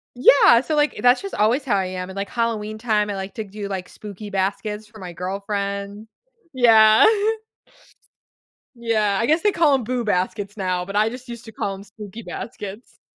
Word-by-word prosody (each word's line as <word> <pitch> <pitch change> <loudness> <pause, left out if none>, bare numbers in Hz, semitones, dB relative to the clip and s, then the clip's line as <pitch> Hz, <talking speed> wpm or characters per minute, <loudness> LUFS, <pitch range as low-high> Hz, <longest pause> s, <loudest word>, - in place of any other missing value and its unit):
Yeah, 245 -1 +6
so, 310 +4 -3
like, 295 0 +1
that's 245 +1 +4
just 395 - -6
always 235 +7 +2
how 220 -6 +1
I 190 -1 0
am, 185 0 -5
and, 190 - -10
like, 200 0 -3
Halloween 220 -3 -2
time, 215 -2 0
I 205 - -3
like 190 0 -6
to 220 - -4
do, 200 0 -7
like, 185 -2 -5
spooky 210 0 -10
baskets 205 +2 -2
for 215 +1 -16
my 180 -2 -8
girlfriend 200 +3 -4 0.5
yeah. 225 - +6 1.7
Yeah, 215 -4 0
I 230 - +1
guess 315 +4 +2
they 415 - +3
call 305 -4 +3
'em, 255 -4 0
"Boo 245 0 -2
Baskets" 200 +1 -2
now, 185 -2 -1
but 200 +2 -6
I 215 +1 +3
just 250 0 -10
used 235 0 -8
to 225 - -11
call 195 -1 -3
'em 195 - -10
spooky 210 +1 -10
baskets. 210 0 -8
210 Hz, 190 wpm, -22 LUFS, 200-235 Hz, 1.7 s, Yeah